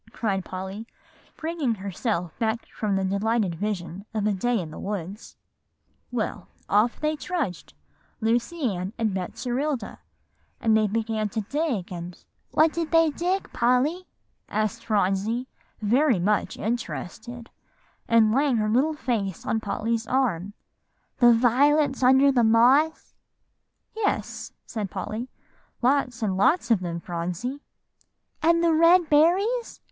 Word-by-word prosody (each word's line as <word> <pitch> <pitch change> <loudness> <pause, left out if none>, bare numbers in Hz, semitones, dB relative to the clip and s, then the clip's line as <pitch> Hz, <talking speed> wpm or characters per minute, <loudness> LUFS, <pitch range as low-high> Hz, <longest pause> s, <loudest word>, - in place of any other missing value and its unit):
cried 200 -5 -1
Polly, 190 +5 -6 0.5
bringing 315 -7 -1
herself 190 -2 -3
back 225 0 -1
from 210 -3 -2
the 195 - 0
delightful 200 +1 0
vision 190 -1 -4
of 210 -1 0
a 210 - +2
day 230 +4 0
in 165 -4 -6
the - - -9
woods; 200 0 -6 0.7
"well, 220 -5 -3 0.2
off 215 +4 +2
they 305 0 0
trudged, 295 - -4 0.4
Lucy 240 +3 0
Ann 185 +3 -4
and 225 -2 0
Betserilda, 250 - -3 0.6
and 220 -1 +3
they 215 -1 +3
began 220 0 -1
to 220 +2 -2
dig 260 - -2
and" 175 0 -7 0.3
"What 315 +1 +3
did 335 -2 -2
they 330 -2 +4
dig, 360 +6 -2
Polly?" 265 +10 +1 0.4
asked 215 +2 -1
Phronsie, 210 +4 0 0.4
very 250 +3 +3
much 205 +4 0
interested, 235 +1 -5 0.6
and 225 -2 +4
laying 275 -1 +2
her 215 -1 0
little 275 +8 +2
face 215 - -2
on 220 - 0
Polly's 225 +2 -2
arm, 205 -7 0 0.6
"the 240 - +6
little 235 -1 +5
violets 285 +3 +3
under 265 +2 +6
the 245 -3 +3
moss?" 250 +8 +3 0.8
"Yes," 440 -2 -2
said 210 -4 -4
Polly, 230 +7 -5 0.5
"lots 250 -3 +1
and 195 -3 0
lots 240 - +2
of 225 - +5
them, 170 -2 -4
Phronsie." 180 - -4 0.8
"And 335 +1 +3
the 335 -1 +4
red 335 +2 +5
berries?" 375 +11 +2
230 Hz, 130 wpm, -25 LUFS, 200-280 Hz, 0.8 s, the